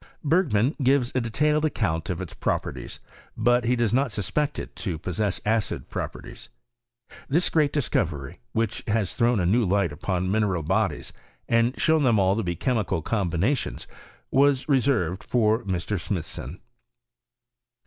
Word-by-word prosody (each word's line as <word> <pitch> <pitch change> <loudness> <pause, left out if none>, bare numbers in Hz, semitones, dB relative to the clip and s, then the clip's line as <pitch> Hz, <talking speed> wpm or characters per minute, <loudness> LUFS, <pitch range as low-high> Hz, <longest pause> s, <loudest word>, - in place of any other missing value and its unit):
Bergman 145 - +2
gives 130 -1 +3
a 130 - +1
detailed 150 +7 +1
account 95 - -1
of 90 0 -2
its 90 - -9
properties; - - -3 0.4
but 120 +2 +3
he 125 +2 +2
does 120 -3 +1
not 130 0 +2
suspect 140 +9 -1
it - - -7
to 90 -7 -3
pos 90 +4 -5
sess 105 -3 0
acid 110 0 -1
properties. - - -6 0.8
This 165 +6 +2
great 150 -3 +3
discovery, 75 - -1
which 115 -2 -1
has 105 -6 0
thrown 120 -2 +2
a 90 - +1
new 115 +7 +3
light 100 -3 +1
upon 90 +4 -2
mineral 100 -5 +1
bodies, - - -1 0.3
and 115 +2 +2
shown 160 -1 +3
them 120 -5 +3
all 95 0 +3
to 115 - 0
be 85 -4 -2
chemical 105 - -1
combiuatioas, 100 - -1 0.5
waa 140 +1 +5
reserved 120 - +1
for 115 -1 +2
Mr. 95 +1 -2
Smithson. 85 - -5
110 Hz, 150 wpm, -25 LUFS, 95-130 Hz, 0.8 s, waa